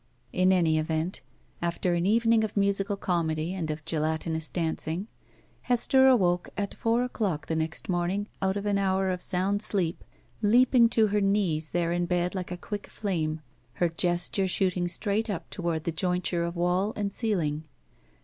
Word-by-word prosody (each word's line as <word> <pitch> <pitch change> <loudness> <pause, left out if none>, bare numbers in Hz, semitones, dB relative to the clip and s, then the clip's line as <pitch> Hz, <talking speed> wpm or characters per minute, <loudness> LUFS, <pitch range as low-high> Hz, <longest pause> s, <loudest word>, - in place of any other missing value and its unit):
In 185 +1 +3
any 165 -4 +3
event, 160 +3 -2 0.4
after 170 +1 0
an 170 +1 +1
evening 225 +1 +3
of 215 -1 -3
musical 200 0 +1
comedy 165 -2 -1
and 170 -5 -3
of 155 0 -4
gelatinous 160 0 -1
dancing, 165 +1 -2 0.6
Hester 265 +2 +4
awoke 180 -9 +3
at 200 -1 -2
four 230 +2 +1
o'clock 205 -10 -2
the 160 - -2
next 160 0 -2
morning 185 +3 -1
out 190 +1 +1
of 200 - -4
an 200 -1 +1
hour 190 -1 +1
of 180 - -2
sotmd 195 +3 0
sleep, 180 -6 0 0.4
leaping 235 +2 +5
to 225 -2 +3
her 210 0 +1
knees 190 -6 +1
there 170 -1 0
in 175 0 0
bed 180 0 0
like 185 -2 -4
a 180 - -3
quick 205 +3 -6
flame, 160 -6 -2 0.3
her 175 - +1
gesture 175 +3 0
shooting 180 -1 0
straight 205 +5 0
up 195 -5 -4
toward 170 -4 -2
the 170 - -1
jointure 180 0 0
of 170 +1 -4
wall 180 +4 +1
and 200 -2 -2
ceiling. 165 -10 -1
180 Hz, 170 wpm, -27 LUFS, 170-205 Hz, 0.6 s, leaping